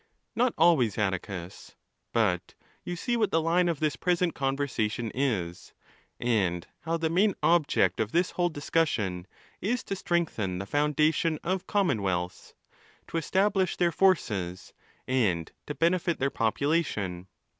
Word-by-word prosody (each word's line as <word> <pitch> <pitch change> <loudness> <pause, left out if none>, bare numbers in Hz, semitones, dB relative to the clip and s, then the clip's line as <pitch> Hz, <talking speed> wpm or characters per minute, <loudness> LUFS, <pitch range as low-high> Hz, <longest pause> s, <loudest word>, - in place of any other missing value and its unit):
—N 240 +3 +3
ot 245 - -4
always, 155 - +4
Atticus. 95 -2 -4 0.4
But 95 -6 0 0.3
you 175 - -4
see 240 +8 -1
what 220 -3 +2
the 165 - +2
line 170 +2 +2
of 165 -4 -2
this 155 -3 0
present 175 0 +1
conversation 130 -5 -1
is, 105 -11 -2 0.5
and 95 -8 0
how 165 +2 -2
the 165 -1 0
main 195 +3 +3
object 170 -3 +3
of 110 0 0
this 175 +2 +1
whole 175 -1 +1
discussion 120 - -1 0.3
is 235 +5 -1
to 195 - -3
strengthen 160 - -1
the 95 - -4
foundation 150 +4 +1
of 185 +1 -2
com 200 -3 +2
'monwealths, 95 -6 -2 0.6
to - - -2
establish 190 +3 +1
their 175 -1 +2
forces, 105 - 0 0.3
and 100 -11 +1 0.2
to 150 - -4
benefit 170 0 +1
their 140 +1 0
'population. 110 - -1
145 Hz, 140 wpm, -28 LUFS, 105-175 Hz, 0.6 s, always